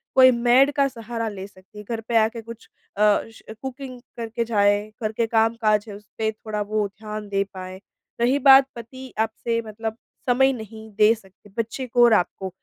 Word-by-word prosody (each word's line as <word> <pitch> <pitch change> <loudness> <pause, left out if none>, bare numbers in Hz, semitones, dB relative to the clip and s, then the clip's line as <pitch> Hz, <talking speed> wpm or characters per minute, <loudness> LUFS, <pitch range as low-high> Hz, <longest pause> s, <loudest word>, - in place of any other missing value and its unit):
कोई 255 -1 +8
मेड 245 +3 +4
का 280 -1 +3
सहारा 230 -2 -5
ले 195 -2 -7
सकती 190 +1 -19
हैं। 210 - -10
घर 230 -1 -3
पे 235 - +2
आके 225 +1 +1
कुछ 230 0 -12 0.3
अ, - - -1 0.3
श - - -16 0.2
कुकिंग 265 -1 -7 0.2
करके 230 0 -3
जाएँ। 205 -1 +2
घर 215 - 0
के 230 +1 0
काम-काज 220 -2 +2
है, 205 - -7
उसपे 220 +1 -4
थोड़ा 215 -1 -5
वो 210 0 -1
ध्यान 210 +1 -8
दे 195 0 +1
पाएँ। 185 0 -8 0.4
रही 255 +4 +3
बात 270 0 +8
पति 255 +3 -10
आपसे 225 +1 -1
मतलब 220 +1 -5 0.3
समय 265 +2 +4
नहीं 220 -2 -9
दे 215 +1 +6
सकते 195 -1 -20
बच्चे 230 +3 -3
को 240 0 +3
और 235 - +5
आपको, 190 -1 0
225 Hz, 185 wpm, -23 LUFS, 210-240 Hz, 0.4 s, कोई